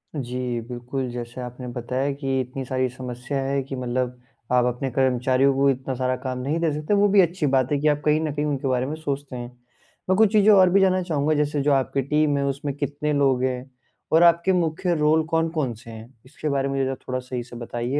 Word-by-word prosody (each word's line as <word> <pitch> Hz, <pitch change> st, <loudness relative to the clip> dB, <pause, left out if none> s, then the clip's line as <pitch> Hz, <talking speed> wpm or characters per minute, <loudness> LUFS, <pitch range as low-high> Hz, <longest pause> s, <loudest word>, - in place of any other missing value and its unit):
जी, 125 Hz, -2 st, -3 dB
बिल्कुल, 125 Hz, +1 st, -4 dB
जैसे 120 Hz, +1 st, -6 dB
आपने 125 Hz, +1 st, -7 dB
बताया 125 Hz, +3 st, -2 dB
कि 135 Hz, -2 st, -2 dB
इतनी 130 Hz, +2 st, -6 dB
सारी 130 Hz, 0 st, 0 dB
समस्या 125 Hz, +2 st, -5 dB
है 135 Hz, 0 st, 0 dB
कि 135 Hz, 0 st, -6 dB
मतलब 125 Hz, 0 st, -2 dB, 0.3 s
आप 125 Hz, -1 st, +4 dB
अपने 125 Hz, +2 st, -1 dB
कर्मचारियों 130 Hz, +1 st, +2 dB
को 140 Hz, 0 st, +3 dB
इतना 130 Hz, 0 st, -2 dB
सारा 130 Hz, 0 st, 0 dB
काम 130 Hz, -1 st, -4 dB
नहीं 145 Hz, +6 st, -1 dB
दे 165 Hz, -2 st, +1 dB
सकते, 150 Hz, +7 st, -2 dB
वो 205 Hz, 0 st, +4 dB
भी 195 Hz, -1 st, +6 dB
अच्छी 170 Hz, -2 st, 0 dB
बात 130 Hz, +1 st, +1 dB
है 145 Hz, -, +2 dB
कि 155 Hz, -, +1 dB
आप 150 Hz, 0 st, +2 dB
कहीं 155 Hz, +1 st, +3 dB
न 155 Hz, -2 st, -2 dB
कहीं 150 Hz, 0 st, -1 dB
उनके 140 Hz, -2 st, -2 dB
बारे 130 Hz, 0 st, +1 dB
में 150 Hz, +3 st, -4 dB
सोचते 140 Hz, -4 st, -4 dB
हैं। 120 Hz, 0 st, -5 dB, 0.6 s
मैं 185 Hz, -, +4 dB
कुछ 220 Hz, -2 st, +5 dB
चीज़ें 210 Hz, 0 st, +6 dB
और 185 Hz, -2 st, +6 dB
भी 195 Hz, +2 st, +4 dB
जानना 185 Hz, -1 st, +3 dB
चाहूँगा 155 Hz, -3 st, 0 dB
जैसे 145 Hz, -1 st, 0 dB
जो 145 Hz, -, +2 dB
आपकी 135 Hz, 0 st, +1 dB
टीम 150 Hz, +1 st, +1 dB
है 140 Hz, -, 0 dB
उसमें 140 Hz, 0 st, -3 dB
कितने 145 Hz, +1 st, -2 dB
लोग 135 Hz, -3 st, +2 dB
हैं? 130 Hz, 0 st, -2 dB, 0.4 s
और 165 Hz, +2 st, +5 dB
आपके 170 Hz, +2 st, +4 dB
मुख्य 175 Hz, 0 st, 0 dB
रोल 155 Hz, +1 st, +3 dB
कौन-कौन 160 Hz, -6 st, 0 dB
से 115 Hz, +1 st, -13 dB
हैं? 110 Hz, +3 st, -11 dB
इसके 150 Hz, +3 st, -5 dB
बारे 140 Hz, -1 st, 0 dB
में 135 Hz, 0 st, -2 dB
मुझे 135 Hz, 0 st, -2 dB
थोड़ा 130 Hz, 0 st, -1 dB
सही 125 Hz, -1 st, -5 dB
से 120 Hz, 0 st, -13 dB
बताइए 120 Hz, +3 st, -3 dB
135 Hz, 225 wpm, -24 LUFS, 125-150 Hz, 0.6 s, भी